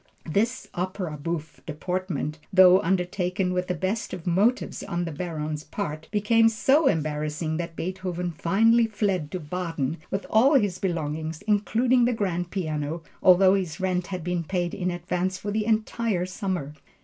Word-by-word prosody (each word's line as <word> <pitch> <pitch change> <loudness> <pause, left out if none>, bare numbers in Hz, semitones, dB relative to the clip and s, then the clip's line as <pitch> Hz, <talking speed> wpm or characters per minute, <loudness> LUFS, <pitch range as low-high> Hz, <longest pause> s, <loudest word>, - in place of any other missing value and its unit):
This 225 +10 0
opera 180 -2 -3
bouffe 155 +1 -5
deportment 165 -1 -3
though 185 -1 +7
undertaken 180 +1 0
with 180 0 -1
the 180 - -1
best 190 +7 -2
of 175 - -11
motives 200 +8 +1
on 175 0 -2
the 165 - -4
Baron's 155 -2 -4
part, 155 -6 -5
became 225 +2 +4
so 270 +7 +3
embarrassing 155 - -1
that 170 -1 -5
Beethoven 180 0 -3
finally 225 +8 +3
fled 195 -8 -1
to 185 - -4
Baden 165 -3 -3
with 195 +1 -3
all 260 +7 +4
his 205 -8 +2
belongings, 160 -3 -3
including 235 +4 +2
the 245 - +2
grand 180 -5 -2
piano, 155 -3 -3 0.2
although 185 +1 +6
his 185 -4 -2
rent 185 -1 0
had 185 -3 -5
been 175 0 -1
paid 175 0 -2
in 180 -1 -1
advance 180 +1 -2
for 205 - -4
the 215 0 0
entire 220 -3 0
summer. 185 -6 -3
180 Hz, 155 wpm, -26 LUFS, 165-200 Hz, 0.2 s, though